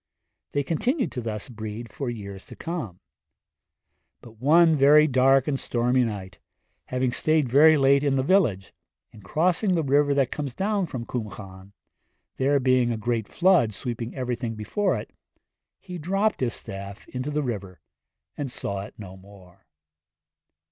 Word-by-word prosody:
They 145 Hz, -, +1 dB
continued 240 Hz, -, -1 dB
to 125 Hz, -, -4 dB
thus 110 Hz, -3 st, -5 dB
breed 110 Hz, -1 st, -7 dB
for 135 Hz, -3 st, -4 dB
years 100 Hz, -4 st, -7 dB
to -, -, -11 dB
come; 160 Hz, -, -5 dB, 1.2 s
but 115 Hz, -2 st, -16 dB
one 160 Hz, +4 st, +5 dB
very 150 Hz, +2 st, +6 dB
dark 135 Hz, -1 st, +3 dB
and 140 Hz, -3 st, -1 dB
stormy 125 Hz, +1 st, +1 dB
night, 100 Hz, -5 st, -5 dB, 0.5 s
having 125 Hz, 0 st, -1 dB
stayed 155 Hz, +4 st, +1 dB
very 155 Hz, +5 st, +6 dB
late 140 Hz, 0 st, +4 dB
in 140 Hz, -2 st, +2 dB
the 130 Hz, -, +1 dB
village, 130 Hz, -, +1 dB, 0.4 s
in 110 Hz, -, -15 dB
crossing 180 Hz, -, +1 dB
the 165 Hz, -, +1 dB
river 145 Hz, +1 st, +2 dB
that 135 Hz, -3 st, +1 dB
comes 140 Hz, -5 st, -4 dB
down 200 Hz, -1 st, 0 dB
from 125 Hz, -5 st, -6 dB
Cwm 110 Hz, -8 st, -5 dB
Llan, 95 Hz, -1 st, -12 dB, 0.6 s
there 140 Hz, +2 st, +2 dB
being 130 Hz, -2 st, +2 dB
a 115 Hz, -, -2 dB
great 115 Hz, -1 st, -2 dB
flood 175 Hz, -, +3 dB
sweeping 120 Hz, +1 st, -5 dB
everything 120 Hz, -3 st, -3 dB
before 150 Hz, -, -1 dB
it, -, -, -10 dB, 0.7 s
he 180 Hz, -2 st, -8 dB
dropped 195 Hz, +7 st, 0 dB
his 120 Hz, -3 st, -1 dB
staff 100 Hz, 0 st, -8 dB
into 130 Hz, +2 st, -4 dB
the 150 Hz, 0 st, -1 dB
river 100 Hz, -, -5 dB, 0.6 s
and 140 Hz, -3 st, -4 dB
saw 100 Hz, -4 st, -4 dB
it 100 Hz, -, -10 dB
no 95 Hz, -3 st, -9 dB
more. 95 Hz, -1 st, -18 dB
125 Hz, 155 wpm, -25 LUFS, 110-150 Hz, 1.2 s, very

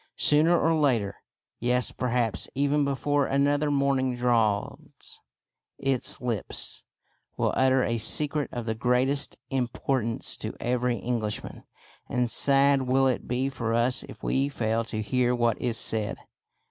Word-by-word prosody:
Sooner 160 Hz, +4 st, +4 dB
or 165 Hz, -, +2 dB
later, 125 Hz, -10 st, +1 dB, 0.5 s
yes, 125 Hz, +1 st, 0 dB
perhaps 120 Hz, -6 st, -1 dB
even 145 Hz, +2 st, +2 dB
before 140 Hz, 0 st, 0 dB
another 145 Hz, +2 st, +1 dB
morning 140 Hz, -3 st, +1 dB
dawns, 115 Hz, -4 st, -1 dB, 0.6 s
its 135 Hz, -2 st, 0 dB
lips 115 Hz, -5 st, -3 dB, 0.5 s
will -, -, 0 dB
utter 130 Hz, 0 st, +3 dB
a 115 Hz, 0 st, -1 dB
secret 145 Hz, +6 st, +1 dB
of 120 Hz, -2 st, -5 dB
the 110 Hz, -, -1 dB
greatest 125 Hz, +5 st, +1 dB
importance 125 Hz, -2 st, -1 dB
to -, -, -5 dB
every 125 Hz, 0 st, 0 dB
Englishman. 115 Hz, -3 st, -4 dB, 0.4 s
And 125 Hz, -1 st, 0 dB
sad 140 Hz, 0 st, +4 dB
will 135 Hz, +1 st, +3 dB
it 130 Hz, -2 st, 0 dB
be 125 Hz, +2 st, 0 dB
for 115 Hz, -4 st, -2 dB
us 125 Hz, +3 st, +1 dB
if -, -, -12 dB
we 135 Hz, +1 st, +1 dB
fail 115 Hz, -4 st, -1 dB
to 110 Hz, -1 st, -4 dB
hear 125 Hz, +2 st, +1 dB
what 120 Hz, -2 st, 0 dB
is 120 Hz, -2 st, -1 dB
said." 110 Hz, -2 st, -1 dB
125 Hz, 135 wpm, -26 LUFS, 115-140 Hz, 0.6 s, Sooner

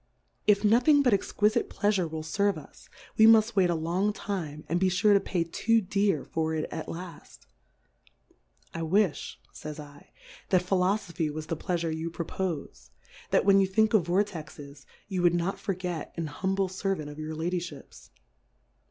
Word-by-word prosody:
If 205 Hz, 0 st, +4 dB
nothing 250 Hz, +7 st, +5 dB
but 250 Hz, -5 st, +3 dB
ex 195 Hz, -, 0 dB
quifite 210 Hz, +1 st, +2 dB
Pleafure 200 Hz, -5 st, 0 dB
will 160 Hz, 0 st, -5 dB
ferve 200 Hz, +4 st, 0 dB
us, 155 Hz, -, -14 dB, 0.3 s
we 220 Hz, -, +7 dB
muft 225 Hz, 0 st, +5 dB
wait 185 Hz, -3 st, +4 dB
a 170 Hz, -, +1 dB
long 175 Hz, +6 st, 0 dB
time, 160 Hz, -8 st, -5 dB
and 170 Hz, +2 st, 0 dB
be 190 Hz, 0 st, +3 dB
fure 195 Hz, +3 st, +3 dB
to 200 Hz, -, +5 dB
pay 180 Hz, -3 st, -1 dB
too 225 Hz, +7 st, +1 dB
dear 200 Hz, -5 st, 0 dB
for 160 Hz, 0 st, -2 dB
it 155 Hz, -, -2 dB
at -, -, -5 dB
laft. 170 Hz, -2 st, -9 dB, 1.3 s
I 165 Hz, -, -4 dB
willi, 185 Hz, +1 st, +2 dB, 0.4 s
fays 155 Hz, 0 st, -8 dB
f 145 Hz, -1 st, -12 dB, 0.4 s
that 185 Hz, -2 st, +3 dB
Philofophy 180 Hz, -4 st, 0 dB
was 155 Hz, +1 st, -6 dB
the 165 Hz, -, -3 dB
Pleafure 170 Hz, -1 st, -2 dB
you 160 Hz, +1 st, -4 dB
pro 165 Hz, 0 st, -5 dB
pofe, 160 Hz, -, -5 dB, 0.4 s
that -, -, +2 dB
when 195 Hz, 0 st, +6 dB
you 195 Hz, -, +3 dB
think 220 Hz, +3 st, +2 dB
of 190 Hz, -7 st, +3 dB
Vortexes 150 Hz, -8 st, -3 dB, 0.2 s
you 185 Hz, -3 st, -2 dB
would 175 Hz, -1 st, +4 dB
not 175 Hz, +3 st, -1 dB
forget 180 Hz, -4 st, -4 dB
an 165 Hz, -, -2 dB
humble 190 Hz, +6 st, -1 dB
Ser 195 Hz, +1 st, -2 dB
vant 155 Hz, -4 st, -7 dB
of 145 Hz, +1 st, -9 dB
your 155 Hz, 0 st, -5 dB
Ladyihips. 160 Hz, -, -5 dB
180 Hz, 175 wpm, -28 LUFS, 160-200 Hz, 1.3 s, we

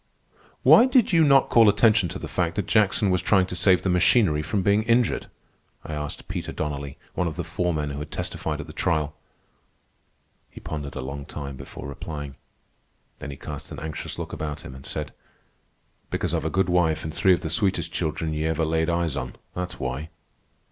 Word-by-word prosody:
"Why 240 Hz, -, +8 dB
did 250 Hz, -6 st, +3 dB
you 165 Hz, -1 st, +6 dB
not 140 Hz, -2 st, +5 dB
call 115 Hz, -3 st, +7 dB
attention 105 Hz, -3 st, +4 dB
to 90 Hz, -, -5 dB
the -, -, -6 dB
fact 85 Hz, -2 st, -1 dB
that 105 Hz, -, -1 dB
Jackson 105 Hz, -1 st, +3 dB
was 90 Hz, -1 st, +2 dB
trying 95 Hz, 0 st, +3 dB
to 90 Hz, -, -6 dB
save 90 Hz, +1 st, +4 dB
the 95 Hz, -, +1 dB
machinery 90 Hz, -3 st, +4 dB
from 95 Hz, +5 st, -1 dB
being 100 Hz, +2 st, +3 dB
injured?" 115 Hz, +1 st, +1 dB, 0.6 s
I 80 Hz, -, -6 dB
asked 75 Hz, -1 st, -5 dB
Peter -, -, -4 dB
Donnelly, 70 Hz, -1 st, -4 dB, 0.2 s
one 90 Hz, -, 0 dB
of 80 Hz, -, -4 dB
the 85 Hz, -, -3 dB
foremen 80 Hz, -3 st, -1 dB
who 70 Hz, -, -5 dB
had 75 Hz, -, -6 dB
testified -, -, -3 dB
at -, -, -5 dB
the -, -, -11 dB
trial. 75 Hz, -1 st, 0 dB, 1.4 s
He -, -, -12 dB
pondered 75 Hz, -2 st, -6 dB
a 65 Hz, -, -3 dB
long 70 Hz, +2 st, -6 dB
time 70 Hz, -2 st, -6 dB
before -, -, -9 dB
replying. 75 Hz, 0 st, -6 dB, 0.9 s
Then -, -, -6 dB
he 70 Hz, -, -7 dB
cast 75 Hz, +1 st, -8 dB
an -, -, -7 dB
anxious 80 Hz, -2 st, -5 dB
look -, -, -6 dB
about 75 Hz, -2 st, -4 dB
him 65 Hz, -, -9 dB
and 65 Hz, 0 st, -9 dB
said: -, -, -5 dB, 1.0 s
"Because -, -, -2 dB
I've -, -, -1 dB
a -, -, +1 dB
good 95 Hz, +1 st, +1 dB
wife 80 Hz, -3 st, +2 dB
an' 80 Hz, -, -3 dB
three 95 Hz, +4 st, +4 dB
of -, -, -7 dB
the 80 Hz, -, -3 dB
sweetest 90 Hz, -4 st, +1 dB
children 80 Hz, -1 st, -1 dB
ye 75 Hz, +1 st, -1 dB
ever 80 Hz, 0 st, 0 dB
laid 80 Hz, +1 st, +1 dB
eyes 85 Hz, -3 st, 0 dB
on, -, -, -4 dB, 0.2 s
that's 90 Hz, 0 st, -5 dB
why." 65 Hz, +4 st, -3 dB
80 Hz, 200 wpm, -25 LUFS, 75-95 Hz, 1.4 s, Why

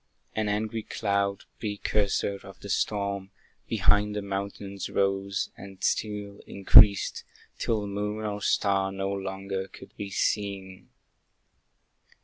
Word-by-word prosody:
An 110 Hz, -1 st, 0 dB
angry 110 Hz, +2 st, -1 dB
cloud, 100 Hz, -2 st, -1 dB, 0.2 s
precursor 100 Hz, -1 st, 0 dB
of 95 Hz, -1 st, -12 dB
the 100 Hz, -, -8 dB
storm, 100 Hz, -1 st, -1 dB, 0.4 s
Behind 105 Hz, 0 st, +3 dB
the 105 Hz, -, -2 dB
mountains 100 Hz, 0 st, -4 dB
rose, 100 Hz, 0 st, 0 dB
and 95 Hz, -1 st, -11 dB
still 105 Hz, -2 st, -1 dB
increased, 100 Hz, 0 st, +6 dB, 0.4 s
Till 110 Hz, -3 st, 0 dB
moon 105 Hz, +2 st, -3 dB
or 105 Hz, -1 st, -3 dB
star 95 Hz, -1 st, +2 dB
no 95 Hz, 0 st, -2 dB
longer 95 Hz, 0 st, -3 dB
could -, -, -14 dB
be 100 Hz, -, -4 dB
seen. 95 Hz, -1 st, -2 dB
100 Hz, 115 wpm, -28 LUFS, 95-105 Hz, 0.4 s, increased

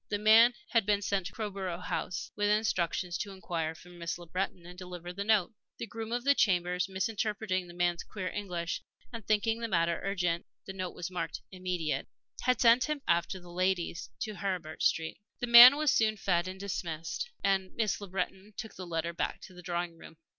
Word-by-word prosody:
The 205 Hz, -, 0 dB
man 225 Hz, +3 st, +6 dB
had 230 Hz, -4 st, +2 dB
been 205 Hz, -1 st, +2 dB
sent 195 Hz, -3 st, 0 dB
to -, -, -8 dB
Crowborough 195 Hz, -5 st, -4 dB
House 180 Hz, 0 st, -4 dB
with 205 Hz, 0 st, +1 dB
instructions 185 Hz, -4 st, 0 dB
to 205 Hz, -, -3 dB
inquire 170 Hz, -4 st, -3 dB
for 175 Hz, +2 st, -15 dB
Miss 170 Hz, -1 st, -5 dB
Le 175 Hz, -, -11 dB
Breton 180 Hz, 0 st, -3 dB
and 180 Hz, +1 st, -10 dB
deliver 180 Hz, -1 st, -8 dB
his 180 Hz, -, -9 dB
note. 205 Hz, -1 st, +2 dB, 0.2 s
The -, -, -4 dB
groom 225 Hz, 0 st, -6 dB
of 240 Hz, 0 st, -1 dB
the 280 Hz, +1 st, +5 dB
chambers, 180 Hz, -5 st, +1 dB
misinterpreting 195 Hz, -1 st, -1 dB
the 175 Hz, -, -12 dB
man's 175 Hz, -1 st, 0 dB
queer 190 Hz, -3 st, -5 dB
English, 180 Hz, -4 st, -3 dB, 0.3 s
and 230 Hz, -1 st, -6 dB
thinking 220 Hz, +2 st, +1 dB
the 230 Hz, -, -2 dB
matter 170 Hz, -4 st, +1 dB
urgent 180 Hz, -4 st, -1 dB, 0.2 s
the 195 Hz, -, -6 dB
note 185 Hz, -2 st, -5 dB
was 175 Hz, +1 st, -5 dB
marked 165 Hz, -3 st, -4 dB
"immediate" 180 Hz, -4 st, -2 dB, 0.3 s
had 250 Hz, -1 st, +2 dB
sent 240 Hz, +2 st, +6 dB
him 300 Hz, -1 st, -3 dB
after 170 Hz, +2 st, +1 dB
the 175 Hz, -1 st, -13 dB
ladies 180 Hz, -5 st, -1 dB
to 215 Hz, -, -2 dB
Heribert 180 Hz, -4 st, -4 dB
Street. 160 Hz, 0 st, +1 dB, 0.2 s
The -, -, -1 dB
man 240 Hz, +3 st, +11 dB
was 300 Hz, -2 st, +2 dB
soon 215 Hz, -1 st, +2 dB
feed 180 Hz, -2 st, +1 dB
and 185 Hz, +1 st, -7 dB
dismissed, 175 Hz, -, -4 dB
and 190 Hz, -1 st, +1 dB
Miss 215 Hz, -4 st, 0 dB
Le 200 Hz, -, -6 dB
Breton 195 Hz, +2 st, -4 dB
took 220 Hz, -, -6 dB
the 185 Hz, -1 st, -8 dB
letter 170 Hz, 0 st, -2 dB
back 170 Hz, -, -2 dB
to 185 Hz, -, -12 dB
the 180 Hz, -, -11 dB
drawing 175 Hz, -1 st, -3 dB
room. 160 Hz, -, -13 dB
185 Hz, 200 wpm, -31 LUFS, 175-215 Hz, 0.3 s, man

